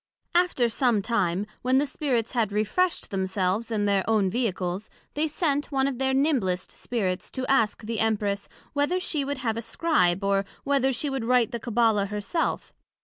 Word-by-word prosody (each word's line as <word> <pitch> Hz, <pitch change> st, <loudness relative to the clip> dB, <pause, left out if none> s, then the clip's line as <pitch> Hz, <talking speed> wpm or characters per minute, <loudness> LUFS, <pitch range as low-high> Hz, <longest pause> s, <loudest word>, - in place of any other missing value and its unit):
After 345 Hz, -9 st, +3 dB
some 230 Hz, -3 st, +1 dB
time, 190 Hz, -4 st, 0 dB, 0.2 s
when 255 Hz, +1 st, +2 dB
the 285 Hz, -, +3 dB
Spirits 260 Hz, -5 st, -1 dB
had 225 Hz, -5 st, 0 dB
refreshed 215 Hz, -, 0 dB
themselves 190 Hz, +3 st, -1 dB
in 210 Hz, -2 st, 0 dB
their 200 Hz, -2 st, +2 dB
own 205 Hz, -4 st, +2 dB
Vehicles, 195 Hz, -4 st, -2 dB, 0.2 s
they 305 Hz, +2 st, +1 dB
sent 290 Hz, -2 st, 0 dB
one 270 Hz, -1 st, +2 dB
of 270 Hz, -3 st, -2 dB
their 265 Hz, 0 st, +2 dB
nimblest 265 Hz, -, +1 dB
Spirits, 190 Hz, -7 st, -2 dB
to 260 Hz, -, -4 dB
ask 225 Hz, -5 st, +1 dB
the 225 Hz, +1 st, -3 dB
Empress, 205 Hz, -2 st, 0 dB, 0.2 s
Whether 290 Hz, +6 st, +1 dB
she 310 Hz, -5 st, -1 dB
would 285 Hz, 0 st, -3 dB
have 230 Hz, -4 st, -2 dB
a -, -, -2 dB
Scribe, 215 Hz, -, +1 dB
or, 195 Hz, 0 st, +2 dB, 0.2 s
whether 275 Hz, -1 st, +2 dB
she 275 Hz, +3 st, 0 dB
would 265 Hz, -4 st, -2 dB
write 250 Hz, -1 st, +3 dB
the 235 Hz, -, -3 dB
Cabbala 225 Hz, -3 st, +2 dB
her 210 Hz, +1 st, -4 dB
self? 325 Hz, -, -2 dB
230 Hz, 180 wpm, -26 LUFS, 205-270 Hz, 0.2 s, After